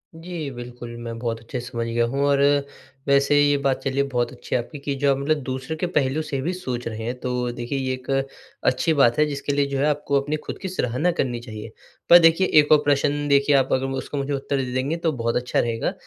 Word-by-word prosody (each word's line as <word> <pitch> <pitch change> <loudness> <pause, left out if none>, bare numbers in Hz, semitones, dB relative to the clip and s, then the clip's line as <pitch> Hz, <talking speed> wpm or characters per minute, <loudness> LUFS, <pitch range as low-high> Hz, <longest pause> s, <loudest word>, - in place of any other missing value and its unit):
जी, 165 -2 -6
बिल्कुल। 120 -1 -8
मैं 115 -1 -6
बहुत 115 -1 -2
अच्छे 120 +3 -6
से 120 - -7
समझ 115 -1 -2
गया 115 0 +1
हूँ 135 +4 -2
और 140 -1 +3 0.7
वैसे 140 +1 +4
ये 145 0 +3
बात 140 -1 +1
चलिए 135 +1 +1
बहुत 120 -1 0
अच्छी - - -5
है 125 - +2
आपकी 145 +5 -10
कि 140 0 -3
जो 140 +1 +2
आप 135 - +1
मतलब 150 +3 +1
दूसरे 130 +3 -4
के 175 +3 -2
पहलू 140 +1 +1
से 150 -3 -3
भी 170 +7 -1
सोच 125 -10 -4
रहे 110 -1 -5
हैं। 120 +2 -2
तो 125 -1 -2
देखिए 120 +3 -4
ये 130 -1 -1
एक 130 +1 -9 0.5
अच्छी 160 +5 +2
बात 130 -6 +4
है 150 - +5
जिसके 145 -1 -3
लिए 140 0 +2
जो 140 0 -3
है 140 - +2
आपको 145 -1 +1
अपनी 145 +2 -2
ख़ुद - - -5
की 190 - -3
सराहना 155 -1 0
करनी 125 -8 -2
चाहिए। 110 -2 -9 0.4
पर 175 - +10
देखिए 165 +3 +4
एक 145 - +2
और 155 - +9
प्रश्न 145 +1 +1
देखिए 140 0 +4
आप 135 -1 +3
अगर 130 0 +1
मु 135 - -3
उसका 145 - -5
मुझे 140 +1 -2
उत्तर 140 0 -2
दे 130 -2 -2
देंगे 135 +6 -1
तो - - +3
बहुत 115 -4 -2
अच्छा 125 0 0
रहेगा 115 -1 -1
135 Hz, 245 wpm, -23 LUFS, 125-145 Hz, 0.7 s, पर